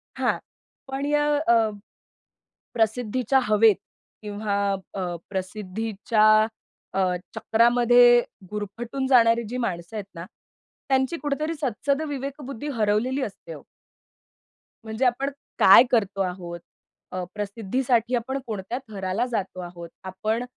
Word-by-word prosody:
हां. -, -, +1 dB, 0.5 s
पण 270 Hz, +1 st, -3 dB
य 295 Hz, +1 st, +1 dB, 0.3 s
अ, 230 Hz, -2 st, +4 dB, 1.0 s
प्रसिद्धीच्या 240 Hz, +3 st, +1 dB
हवेत 215 Hz, -1 st, +5 dB, 0.5 s
किंवा 205 Hz, -1 st, -3 dB, 0.4 s
अ, 195 Hz, -, -4 dB, 0.3 s
प्रसिद्धीच्या 210 Hz, +3 st, -1 dB, 0.7 s
अ, 195 Hz, -, 0 dB, 0.4 s
चक्रामध्ये 240 Hz, +1 st, +5 dB, 0.3 s
गुरफटून 230 Hz, +6 st, -4 dB
जाणारी 235 Hz, -3 st, +5 dB
जी 250 Hz, -, -3 dB
माणसं 185 Hz, -5 st, -3 dB
आहेत 210 Hz, -2 st, -4 dB
ना, 170 Hz, +1 st, -7 dB, 0.6 s
त्यांची 265 Hz, +4 st, +1 dB
कुठेतरी 305 Hz, +2 st, -2 dB
सत्सगविवेक 280 Hz, +2 st, -2 dB
बुद्धी 275 Hz, +2 st, -6 dB
हरवलेली 220 Hz, +6 st, +1 dB
असते 260 Hz, -, -6 dB
ओ. -, -, -10 dB, 1.2 s
म्हणजे 220 Hz, +4 st, -2 dB
आपण 255 Hz, +3 st, +1 dB, 0.3 s
काय 195 Hz, +5 st, +9 dB
करतो 200 Hz, -4 st, +1 dB
आहोत, 180 Hz, -2 st, -4 dB, 0.5 s
अ, 185 Hz, 0 st, -3 dB
प्रसिद्धीसाठी 230 Hz, +4 st, 0 dB
आपण 260 Hz, +3 st, -2 dB
कोणत्या 210 Hz, +2 st, -4 dB
थराला 195 Hz, +2 st, -2 dB
जातो 195 Hz, -4 st, -3 dB
आहोत, 175 Hz, -1 st, -9 dB
आपण 215 Hz, +6 st, -2 dB
225 Hz, 110 wpm, -25 LUFS, 200-255 Hz, 1.2 s, काय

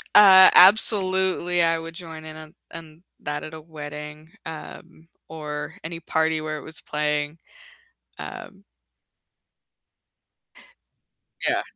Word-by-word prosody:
Uh, 190 Hz, -2 st, +9 dB
absolutely 190 Hz, -3 st, +4 dB
I 165 Hz, 0 st, +2 dB
would 165 Hz, 0 st, -8 dB
join 160 Hz, -3 st, -10 dB
in 155 Hz, 0 st, -9 dB
on 155 Hz, +2 st, -13 dB, 0.2 s
on 165 Hz, +1 st, -11 dB, 0.2 s
that 145 Hz, 0 st, -4 dB
at 155 Hz, -, -9 dB
a 160 Hz, -, -9 dB
wedding, 150 Hz, 0 st, -10 dB
um, 160 Hz, 0 st, -10 dB, 0.2 s
or 150 Hz, -2 st, -6 dB
any 165 Hz, +1 st, -6 dB
party 160 Hz, -1 st, 0 dB
where 155 Hz, 0 st, -4 dB
it -, -, -9 dB
was 160 Hz, -, -9 dB
playing, 150 Hz, +1 st, -2 dB, 0.8 s
um 195 Hz, -2 st, -10 dB, 2.8 s
Yeah. -, -, +1 dB
160 Hz, 110 wpm, -23 LUFS, 155-175 Hz, 2.8 s, Uh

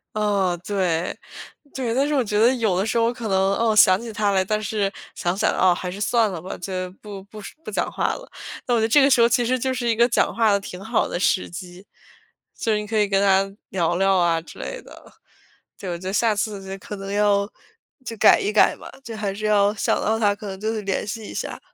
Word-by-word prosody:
哦， 200 Hz, -5 st, 0 dB
对， 180 Hz, -4 st, -1 dB, 0.6 s
对， 245 Hz, -4 st, -2 dB
但 275 Hz, +3 st, +1 dB
是 300 Hz, -, 0 dB
我 260 Hz, -, +2 dB
觉 210 Hz, -1 st, -1 dB
得 235 Hz, +3 st, +5 dB
有 220 Hz, -6 st, 0 dB
的 195 Hz, -, +1 dB
时 230 Hz, +1 st, -1 dB
候 230 Hz, +1 st, +2 dB
可 235 Hz, -2 st, -6 dB
能， 190 Hz, -2 st, +1 dB, 0.2 s
哦， 225 Hz, -1 st, +1 dB
想 185 Hz, -2 st, +6 dB
起 235 Hz, -1 st, -7 dB
他 205 Hz, -1 st, 0 dB
来， 190 Hz, -1 st, +2 dB
但 215 Hz, +2 st, -1 dB
是 205 Hz, -1 st, -1 dB, 0.2 s
想 175 Hz, +2 st, -2 dB
想， -, -, +2 dB
哦， 185 Hz, -1 st, +4 dB
还 180 Hz, +1 st, -5 dB
是 200 Hz, +3 st, -7 dB
算 225 Hz, -2 st, +2 dB
了 170 Hz, -, -6 dB
吧， 185 Hz, -, -7 dB
就 185 Hz, 0 st, -4 dB
不 200 Hz, -2 st, -9 dB
不 210 Hz, +1 st, -12 dB
说 205 Hz, -, -10 dB
不 -, -, -7 dB
讲 -, -, -2 dB
话 -, -, -1 dB
了。 -, -, -11 dB, 0.4 s
那 245 Hz, -, +1 dB
我 235 Hz, -, +3 dB
觉 -, -, 0 dB
得 220 Hz, -, +2 dB
这 285 Hz, +5 st, +5 dB
个 275 Hz, -, +5 dB
时 245 Hz, -3 st, +4 dB
候， 235 Hz, -, +5 dB
其 245 Hz, -1 st, +2 dB
实 255 Hz, +1 st, 0 dB
就 260 Hz, +2 st, -1 dB
是 250 Hz, -2 st, -2 dB
一 230 Hz, -, +2 dB
个 240 Hz, +2 st, +4 dB
讲 -, -, +1 dB
话 225 Hz, -2 st, +3 dB
的 200 Hz, -, +3 dB
挺 190 Hz, 0 st, -9 dB
好 225 Hz, +1 st, 0 dB
的 175 Hz, -, -4 dB
时 185 Hz, -, +1 dB
机， 180 Hz, +1 st, -10 dB, 0.7 s
就 225 Hz, -, -1 dB
是 210 Hz, -, +1 dB
你 210 Hz, -, -6 dB
可 220 Hz, 0 st, -1 dB
以 210 Hz, -1 st, +3 dB
跟 195 Hz, 0 st, +1 dB
他 195 Hz, 0 st, +2 dB
聊 175 Hz, -2 st, 0 dB
聊 195 Hz, 0 st, +3 dB
啊 170 Hz, -2 st, +2 dB
之 165 Hz, -, -14 dB
类 -, -, -6 dB
的， -, -, -15 dB, 0.7 s
就 185 Hz, -, -5 dB
我 170 Hz, -, -3 dB
就 185 Hz, +2 st, -5 dB
下 220 Hz, +1 st, +2 dB
次 205 Hz, -2 st, -3 dB
就 195 Hz, -, -5 dB
可 205 Hz, -, -8 dB
能 195 Hz, 0 st, -7 dB
要 205 Hz, -1 st, +2 dB, 0.6 s
就 230 Hz, -3 st, -7 dB
改 -, -, +6 dB
一 205 Hz, -, -1 dB
改 215 Hz, -, +4 dB
嘛， -, -, -12 dB
就 230 Hz, -4 st, -7 dB
还 210 Hz, -2 st, -2 dB
是 215 Hz, +1 st, -5 dB
要 205 Hz, -1 st, +3 dB
想 -, -, +1 dB
到 220 Hz, +1 st, +1 dB
他， 205 Hz, -2 st, +2 dB
可 205 Hz, 0 st, -9 dB
能 190 Hz, 0 st, -6 dB
就 220 Hz, +1 st, -1 dB
会 215 Hz, -, -3 dB
联 195 Hz, 0 st, -2 dB
系 220 Hz, +1 st, -5 dB
一 -, -, -8 dB
下。 -, -, -5 dB
205 Hz, 280 characters per minute, -22 LUFS, 190-225 Hz, 0.7 s, 想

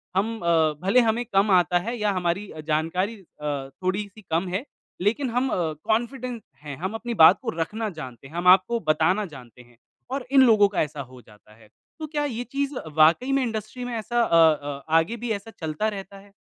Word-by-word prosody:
हम 225 Hz, +4 st, 0 dB
अ, 165 Hz, -3 st, +2 dB
भले 195 Hz, +7 st, +4 dB
हमें 230 Hz, +2 st, +1 dB
कम 200 Hz, +2 st, +3 dB
आता 180 Hz, -1 st, +4 dB
है 240 Hz, +1 st, -2 dB
या 210 Hz, -1 st, +1 dB
हमारी 180 Hz, +4 st, -2 dB
अ, 155 Hz, -, -10 dB
जानकारी 170 Hz, +8 st, 0 dB
अ, 150 Hz, -7 st, -6 dB
थोड़ी-सी 200 Hz, +3 st, -3 dB
कम 170 Hz, +3 st, +1 dB
है, 190 Hz, +9 st, -3 dB, 0.4 s
लेकिन 230 Hz, +8 st, 0 dB
हम 250 Hz, +3 st, 0 dB
अ, -, -, -1 dB, 0.3 s
कॉन्फिडेंट 240 Hz, +1 st, -2 dB, 0.2 s
हैं, 145 Hz, -2 st, -6 dB
हम 190 Hz, +6 st, -4 dB
अपनी 240 Hz, 0 st, -3 dB
बात 180 Hz, +4 st, +8 dB
को -, -, -3 dB
रखना 215 Hz, +6 st, -2 dB
जानते 130 Hz, 0 st, -9 dB
हैं, 160 Hz, -, -14 dB
हम 175 Hz, +1 st, -1 dB
आपको 215 Hz, +5 st, -3 dB
बताना 180 Hz, +7 st, +1 dB
जानते 125 Hz, -2 st, -13 dB
हैं 120 Hz, -1 st, -21 dB, 0.3 s
और 270 Hz, -2 st, -3 dB
इन 275 Hz, -, +6 dB
लोगों 205 Hz, -2 st, +5 dB
का -, -, +2 dB
ऐसा 150 Hz, -1 st, -3 dB
हो 125 Hz, -1 st, -13 dB
जाता 105 Hz, 0 st, -20 dB
है। 110 Hz, -1 st, -20 dB, 0.3 s
तो 310 Hz, -, -5 dB
क्या 295 Hz, -, +1 dB
ये 245 Hz, -3 st, -3 dB
चीज़ 280 Hz, +3 st, -3 dB, 0.2 s
वाक़ई 165 Hz, -, +4 dB
में 270 Hz, -1 st, +2 dB
इंडस्ट्री 225 Hz, +2 st, -4 dB
में 245 Hz, -, -5 dB
ऐसा 240 Hz, +2 st, -1 dB
अ 165 Hz, -, +3 dB, 0.2 s
अ, 145 Hz, -2 st, -7 dB, 0.2 s
आगे 200 Hz, +9 st, -2 dB
भी 235 Hz, 0 st, -4 dB
ऐसा 225 Hz, -, -13 dB
चलता 160 Hz, +6 st, -2 dB
रहता 195 Hz, +1 st, -9 dB
है? 200 Hz, 0 st, -18 dB
195 Hz, 210 wpm, -24 LUFS, 160-235 Hz, 0.4 s, बात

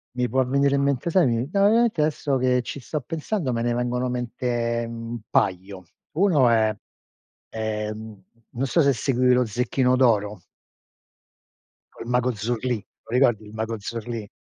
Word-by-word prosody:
mi 125 Hz, -1 st, 0 dB
può 130 Hz, +2 st, +2 dB
venire 140 Hz, +2 st, +2 dB
in 140 Hz, -, +1 dB
mente 140 Hz, +3 st, 0 dB
sai 175 Hz, 0 st, +4 dB
mi 120 Hz, +3 st, -1 dB
no, 200 Hz, +1 st, +3 dB
veramente 225 Hz, -5 st, +3 dB
adesso 150 Hz, -2 st, 0 dB
che 125 Hz, 0 st, +2 dB
ci 140 Hz, -, -6 dB
sto 150 Hz, +3 st, -4 dB
pensando 160 Hz, -, -3 dB
me 115 Hz, -, -1 dB
ne 120 Hz, 0 st, 0 dB
vengono 125 Hz, +1 st, -1 dB
in -, -, -2 dB
mente, 120 Hz, -1 st, -2 dB
mhmm, 115 Hz, 0 st, -7 dB
un 120 Hz, -, -4 dB
paio. 95 Hz, 0 st, 0 dB, 0.3 s
Uno 160 Hz, -7 st, +4 dB
è 110 Hz, -2 st, +2 dB, 0.7 s
è, 110 Hz, -1 st, -3 dB
mhmm, 110 Hz, -2 st, -10 dB, 0.3 s
non 130 Hz, +2 st, -2 dB
so 165 Hz, +5 st, +3 dB
se 140 Hz, -1 st, +4 dB
seguivi 125 Hz, 0 st, +2 dB
lo 125 Hz, 0 st, +3 dB
Zecchino 125 Hz, +3 st, +1 dB
d'Oro. 105 Hz, -6 st, +2 dB, 1.5 s
Con -, -, -9 dB
il -, -, -8 dB
Mago 125 Hz, +1 st, +2 dB
Zurlì, 120 Hz, +3 st, -1 dB
te -, -, -40 dB
lo -, -, +1 dB
ricordi 120 Hz, -5 st, +3 dB
il 105 Hz, -, -13 dB
Mago 110 Hz, +1 st, -3 dB
Zurlì? 115 Hz, +1 st, -5 dB
125 Hz, 180 wpm, -24 LUFS, 115-135 Hz, 1.5 s, sai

